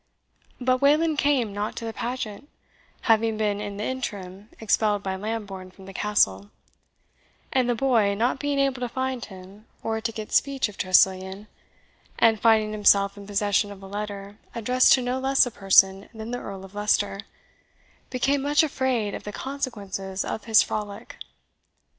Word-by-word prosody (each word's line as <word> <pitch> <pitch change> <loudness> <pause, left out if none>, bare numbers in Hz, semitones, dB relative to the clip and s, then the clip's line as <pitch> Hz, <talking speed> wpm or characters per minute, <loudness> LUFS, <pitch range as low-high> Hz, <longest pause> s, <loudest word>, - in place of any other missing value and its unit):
But 255 0 +1
Wayland 305 +2 +3
came 260 -8 +1
not 205 +1 -3
to 230 - -6
the 225 - -4
pageant, 245 +2 -5 0.5
having 225 -1 +2
been 210 -1 0
in 205 -1 -5
the 210 - -3
interim 205 -5 -5
expelled 210 -2 +1
by 190 -1 -2
Lambourne 200 -2 -5
from 190 +1 -16
the 195 - -10
Castle; 100 - +1 1.0
and 255 -2 +2
the 240 - +2
boy, 225 -5 +2
not 240 +5 0
being 290 -1 -1
able 275 -2 +1
to 245 -1 -3
find 260 0 -3
him, 195 +2 -13 0.2
or 220 0 -2
to 225 - -2
get 215 -1 -7
speech 275 -3 +2
of 210 - -12
Tressilian, 190 +2 +2 0.7
and 225 -2 +4
finding 220 -2 +4
himself 200 -1 +3
in 200 -1 -11
possession 205 0 +1
of 195 -1 -11
a - - -8
letter 205 0 -6 0.2
addressed 250 +3 +3
to 255 - +3
no 250 +1 -1
less 270 0 +4
a 245 - -5
person 195 -1 +4
than 220 +1 -7
the 245 - -3
Earl 195 -1 -8
of 195 - -15
Leicester, 205 -1 0 0.9
became 270 +2 +1
much 290 +3 +3
afraid 260 -8 -1
of - - -6
the 210 - -6
consequences 200 -8 -4
of 220 - -5
his 225 -1 +6
frolic. 205 -1 -6
215 Hz, 165 wpm, -25 LUFS, 200-250 Hz, 1.0 s, his